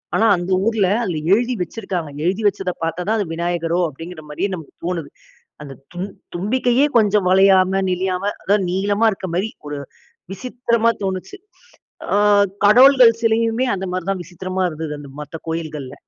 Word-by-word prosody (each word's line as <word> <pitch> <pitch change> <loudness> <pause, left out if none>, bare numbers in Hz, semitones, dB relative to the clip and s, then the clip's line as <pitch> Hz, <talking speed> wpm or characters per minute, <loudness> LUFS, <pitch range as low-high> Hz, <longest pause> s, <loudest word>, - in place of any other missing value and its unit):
ஆனா 225 - +3
அந்த 175 +2 -4
ஊர்ல 220 -4 +2 0.2
அதில 175 -7 -2 0.2
எழுதி 240 +4 +2
வச்சிருக்காங்க. 180 -3 -4 0.2
எழுதி 190 +5 0
வச்சத 195 -2 -1
பார்த்தா 165 +2 -2
தான் 220 +1 +2
அது 205 - -1
விநாயகரோ 170 0 -1
அப்படிங்கிற 165 +3 -9
மாதிரியே 150 +7 -2
நமக்கு 165 -5 -8
தோணுது. 170 -5 -3 0.5
அந்த 140 -2 -9 0.2
தும் 180 +3 -4 0.3
தும்பிக்கையே 245 +8 +1
கொஞ்சம் 210 -3 +3
வளையாம 190 0 +4
நெழியாம 185 +1 -1 0.2
அதாவது 200 0 +2
நீளமா, 200 +4 0
இருக்கிற 190 -1 -6
மாதிரி 190 +5 0 0.2
ஒரு 145 -1 -4 0.5
விசித்திரமா 235 +1 0
தோணுச்சு. 190 - -4 0.8
அ - - +3 0.5
கடவுள்கள் 250 +2 +7
சிலையுமே 230 +2 +1
அந்த 190 0 -4
மாதிரி 185 0 -4
தான் 190 -2 -3
விசித்திரமா 185 +2 -4
இருந்தது, 155 -1 -5
அந்த 145 -1 -11
மத்த 150 - -9
கோயில்கள்ல. 155 -5 -5
190 Hz, 150 wpm, -20 LUFS, 175-220 Hz, 0.8 s, கடவுள்கள்